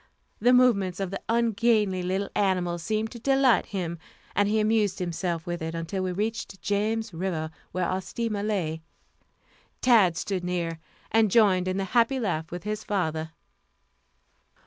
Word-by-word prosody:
The 245 +3 +4
movements 205 -8 +3
of 195 -2 -2
the 195 - -4
ungainly 225 -4 +2
little 190 +2 -2
animal 180 -3 +1
seemed 215 +5 -2
to 235 - -9
delight 270 0 +3
him, 175 -5 -4 0.4
and 205 +1 +3
he 215 +1 +2
amused 215 -2 +2
himself 175 -1 -2
with 175 -1 -4
it 160 +1 -4
until 165 +4 -3
we 185 0 -1
reached 205 0 -3
James 210 +3 -1
River, 165 -2 -3 0.2
where 185 -1 -1
our 185 +2 -1
steamer 220 +1 -3
lay. 180 -7 -1 1.0
Tad 210 -10 +4
stood 190 0 -2
near, 170 -2 -2 0.3
and 220 -1 +4
joined 190 -4 +4
in 185 +1 -1
the 195 - 0
happy 245 +2 +3
laugh 165 -8 -2
with 175 0 -6
his 215 0 -3
father. 160 -5 -1
195 Hz, 155 wpm, -26 LUFS, 175-220 Hz, 1.0 s, The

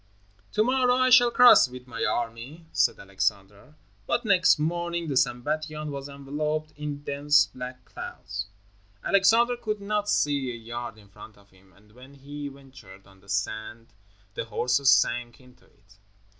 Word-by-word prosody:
"To 215 - +3
morrow 250 +1 +2
I 255 0 +2
shall 245 -1 +7
cross 245 - +7
with 125 0 -11
my 115 -3 -5
army," 120 +8 -3
said - - +2
Alexander, 100 +6 -4 0.3
but 240 - 0
next 185 -3 +4
morning 170 +2 -2
the 140 - -2
Sambatyon 150 +5 -1
was 140 0 -6
enveloped 150 +2 -4
in 145 -1 -6
dense 145 +1 +3
black 125 -1 -9
clouds. 100 +1 -7 0.6
Alexander 225 +5 +4
could 215 -3 -4
not 205 0 -2
see 140 -3 +1
a 120 - -5
yard 115 0 -7
in 105 -2 -18
front 105 +2 -14
of 100 -1 -23
him, 95 0 -24
and 105 +1 -24
when 130 +4 -16
he 145 +1 -8
ventured 130 -9 -14
on 95 0 -20
to - - -25
the 100 - -21
sand, 110 +3 -4 0.4
the - - -4
horses 125 +5 +1
sank 120 -3 +2
into 125 -1 -21
it. 100 0 -26
135 Hz, 160 wpm, -26 LUFS, 115-155 Hz, 0.6 s, shall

